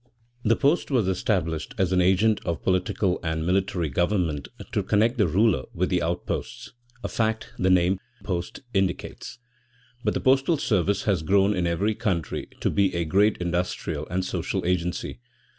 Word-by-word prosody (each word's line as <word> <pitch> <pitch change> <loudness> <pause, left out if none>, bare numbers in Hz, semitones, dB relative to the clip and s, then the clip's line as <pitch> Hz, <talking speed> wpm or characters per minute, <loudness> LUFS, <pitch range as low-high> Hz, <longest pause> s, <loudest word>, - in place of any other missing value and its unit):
The 115 +1 +4
post 145 +5 +1
was 125 -8 +2
established 90 -6 -1
as 95 -1 +1
an 90 -1 +3
agent 100 +4 +3
of 85 - -3
political 95 0 +1
and 80 -1 -2
military 90 -2 0
government 85 -3 0 0.2
to - - +1
connect 115 +4 +1
the 105 - +4
ruler 95 - +2
with - - 0
the - - +2
outposts - - -4 0.3
(a - - -1
fact 110 -1 -1
the 95 - +2
name 90 +1 +3 0.2
post 90 -3 -4
indicates), 95 +3 -2 0.7
but - - 0
the - - +1
postal 135 +5 +3
service 100 - +1
has 95 -6 +1
grown 100 +5 +3
in 90 -1 0
every 100 +6 +1
country 100 -7 -2
to - - +1
be 100 -3 +2
a 85 -1 0
great 100 +6 +3
industrial 85 -3 -2
and 90 +1 -1
social - - -2
agency. 90 +3 -1
95 Hz, 160 wpm, -25 LUFS, 85-105 Hz, 0.7 s, The